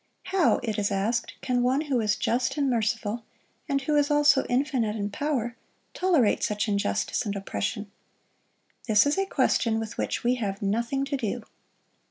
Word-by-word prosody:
How, 375 -4 +4
it 220 -3 -2
is 200 - +1
asked, 205 +5 -1
can 250 -1 0
One 255 +4 +2
who 285 -5 0
is 210 -1 +1
just 245 +5 0
and 285 -1 +1
merciful, 225 -2 -1 0.5
and 275 -1 0
who 300 +2 0
is 290 0 +3
also 295 -1 +4
infinite 245 -4 +1
in 205 -1 -3
power, 245 -2 -2 0.4
tolerate 330 - +2
such 210 +1 0
injustice 200 - 0
and 205 -2 -3
oppression? 195 - -3 1.0
This 210 -2 +5
is 290 +6 +1
a 390 - 0
question 225 -10 +1
with 220 -1 -6
which - - -2
we 245 +1 +2
have 195 -2 -2
nothing 235 +7 -1
to 275 - -2
do. 240 -2 -3
235 Hz, 170 wpm, -26 LUFS, 210-275 Hz, 1.0 s, This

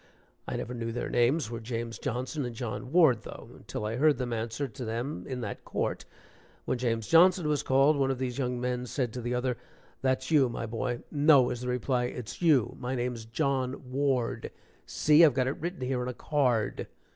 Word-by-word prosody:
I - - -3
never 125 - -4
knew 115 -1 -3
their 120 - -4
names 120 +1 +2
were 115 - -4
James 115 0 -5
Johnson 130 +3 -3
and 120 -2 -5
John 120 +2 -5
Ward, 155 -10 +5
though, - - -10
until 105 - -6
I 110 +2 -2
heard 150 +2 +4
them 125 -2 -3
answer 115 +5 -2
to 125 +1 -8
them 120 +6 -4
in 130 -2 -4
that 100 -3 -5
court. - - -3 0.6
When 130 - -1
James 115 -3 -1
Johnson 175 0 +5
was 150 -1 +1
called, 135 +3 +4
one 135 -1 +2
of 135 - 0
these 130 0 -3
young 125 -2 -1
men 125 0 -2
said 125 -3 -2
to 125 - -5
the 120 +1 -2
other: 125 -1 -1 0.4
"That's 130 +3 0
you, 140 -5 +5
my 115 - -4
boy." 120 +2 -3
"No," 145 -2 +6
was 125 -1 -2
the 125 - -4
reply, 125 0 0
"it's 120 +2 -6
you 150 -9 +3
my 130 +1 -3
name's 120 -2 -3
John 130 +1 -2
Ward 135 -3 0 0.4
see, 155 +2 +5
I've 150 -6 +6
got 130 -2 +2
it 130 - -2
written 175 -2 -4
here 125 0 -1
on 125 - -3
a 125 - -4
card." 125 -8 0
125 Hz, 205 wpm, -29 LUFS, 120-140 Hz, 0.6 s, No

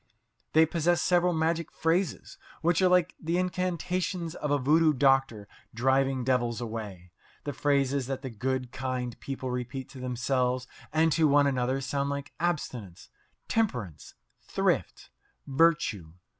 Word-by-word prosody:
They 160 +1 +6
possess 170 +2 +1
several 180 0 +3
magic 160 0 0
phrases, 165 0 -1 0.2
which 170 +2 +3
are 185 - +5
like 180 -2 +3
the 165 +2 0
incantations 180 -1 -2
of 150 - -4
a 145 - +3
voodoo 155 +4 +4
doctor 135 -6 +2 0.3
driving 135 +1 +2
devils 120 -2 0
away. 105 -7 -6 0.3
The 145 - -4
phrases 140 -1 +1
that 135 0 -4
the 130 - -5
good, 125 +2 -2
kind 125 -2 -3
people 130 -2 -5
repeat 125 +1 -4
to 135 - -11
themselves 125 0 0 0.3
and 160 +1 +3
to 160 0 +4
one 145 0 +5
another 130 0 0
sound 140 +2 -1
like 140 0 -5
"abstinence," 125 - -3 0.4
"temperance," 120 - -2 0.3
"thrift," - - -1 0.3
"virtue." 135 - +1
135 Hz, 135 wpm, -28 LUFS, 125-165 Hz, 0.4 s, They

